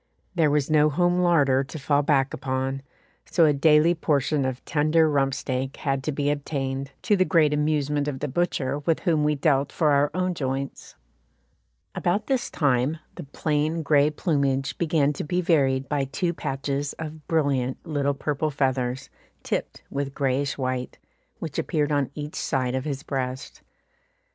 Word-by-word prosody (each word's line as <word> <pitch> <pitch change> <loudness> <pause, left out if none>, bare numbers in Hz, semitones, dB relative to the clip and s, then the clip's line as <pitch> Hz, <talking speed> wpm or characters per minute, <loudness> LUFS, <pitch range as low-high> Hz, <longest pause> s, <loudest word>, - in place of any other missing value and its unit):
There 165 -4 +3
was 145 0 +1
no 155 0 +5
home 175 +4 +2
larder 145 -7 +3
to 150 - -8
fall 145 0 +2
back 140 -2 +2
upon, 130 +1 -2 0.5
so 165 0 +4
a 150 - +4
daily 150 +3 +5
portion 150 -3 0
of 130 -1 -4
tender 155 +2 +3
rump 135 -3 +1
steak 130 0 -3
had 135 -2 -1
to 155 - 0
be 145 0 0
obtained, 135 -2 -3
to 210 - +3
the 185 - +3
great 160 -5 +3
amusement 150 -1 0
of 135 -3 -3
the 150 - -2
butcher 145 -2 -1
with 160 +2 0
whom 160 -4 +2
we 150 0 +2
dealt 140 -1 +1
for 155 -2 +2
our 145 +1 +3
own 185 0 0
joints. 135 -3 -4 1.0
About 180 +4 0
this 265 -3 -1
time 140 0 +1 0.2
the - - -8
plain 155 +3 -1
grey 145 0 +4
plumage 140 -4 0
began 155 -3 +2
to - - -5
be 180 +4 -1
varied 135 -7 +2
by 145 -2 0
two 170 +6 -2
patches 140 -1 -3
of 155 -1 -8
brilliant 140 -5 +1
little 140 -3 0
purple 150 +2 -1
feathers, 130 -2 -1 0.3
tipped - - -3
with 140 -1 -3
greyish 135 0 0
white, 130 -2 -3 0.4
which 155 -4 -5
appeared 150 -3 0
on 145 -2 +1
each 150 0 -6
side 130 -2 -1
of 130 +1 -2
his 145 -1 -4
breast. 130 -2 -4
145 Hz, 165 wpm, -25 LUFS, 135-155 Hz, 1.0 s, no